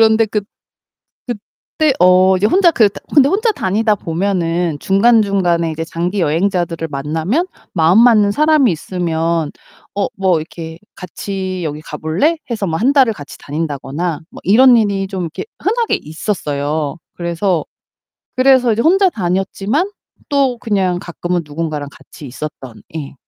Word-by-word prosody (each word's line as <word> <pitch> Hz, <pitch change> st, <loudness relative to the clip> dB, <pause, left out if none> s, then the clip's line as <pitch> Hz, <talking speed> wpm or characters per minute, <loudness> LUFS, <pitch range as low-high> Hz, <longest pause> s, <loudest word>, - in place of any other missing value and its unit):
그런데 220 Hz, 0 st, +4 dB
그 210 Hz, 0 st, -1 dB, 1.4 s
그때 310 Hz, -3 st, +3 dB
어 185 Hz, +1 st, +5 dB
이제 200 Hz, -, +1 dB
혼자 355 Hz, -, +4 dB
그 220 Hz, -8 st, +4 dB
다 -, -, -11 dB
근데 280 Hz, -2 st, +6 dB
혼자 435 Hz, +7 st, +2 dB
다니다 215 Hz, -, +1 dB
보면은 170 Hz, -3 st, -1 dB
중간중간에 195 Hz, -5 st, +2 dB
이제 165 Hz, +1 st, -4 dB
장기 175 Hz, +4 st, -2 dB
여행자들을 170 Hz, 0 st, 0 dB
만나면 160 Hz, -, -1 dB, 0.3 s
마음 170 Hz, +6 st, +4 dB
맞는 220 Hz, -4 st, +5 dB
사람이 300 Hz, -2 st, +3 dB
있으면 165 Hz, -2 st, -2 dB, 0.4 s
어 200 Hz, -, 0 dB
뭐 185 Hz, -4 st, +2 dB
이렇게 160 Hz, 0 st, -8 dB, 0.2 s
"같이 185 Hz, 0 st, -5 dB
여기 150 Hz, -1 st, -4 dB
가볼래?" 160 Hz, -, -1 dB
해서 215 Hz, -4 st, -2 dB
뭐 160 Hz, -1 st, -1 dB
1 260 Hz, +5 st, +3 dB
달을 265 Hz, -5 st, +5 dB
같이 145 Hz, -6 st, -11 dB
다닌다거나 150 Hz, +2 st, -3 dB
뭐 -, -, -12 dB
이런 245 Hz, +5 st, +6 dB
일이 200 Hz, -3 st, 0 dB
좀 190 Hz, -1 st, -4 dB
이렇게 165 Hz, -, -5 dB, 0.2 s
흔하게 460 Hz, +3 st, 0 dB
있었어요. 150 Hz, -3 st, -3 dB, 0.2 s
그래서 170 Hz, 0 st, -1 dB, 0.7 s
그래서 255 Hz, -2 st, +4 dB
이제 225 Hz, -, 0 dB
혼자 380 Hz, +6 st, +4 dB
다녔지만 195 Hz, -, -1 dB, 0.4 s
또 270 Hz, -4 st, +1 dB
그냥 190 Hz, -5 st, 0 dB
가끔은 175 Hz, -1 st, -3 dB
누군가랑 150 Hz, -1 st, -4 dB
같이 145 Hz, -, -13 dB
있었던 130 Hz, -2 st, -8 dB
예. 145 Hz, -3 st, -6 dB
185 Hz, 310 characters per minute, -16 LUFS, 160-225 Hz, 1.4 s, 근데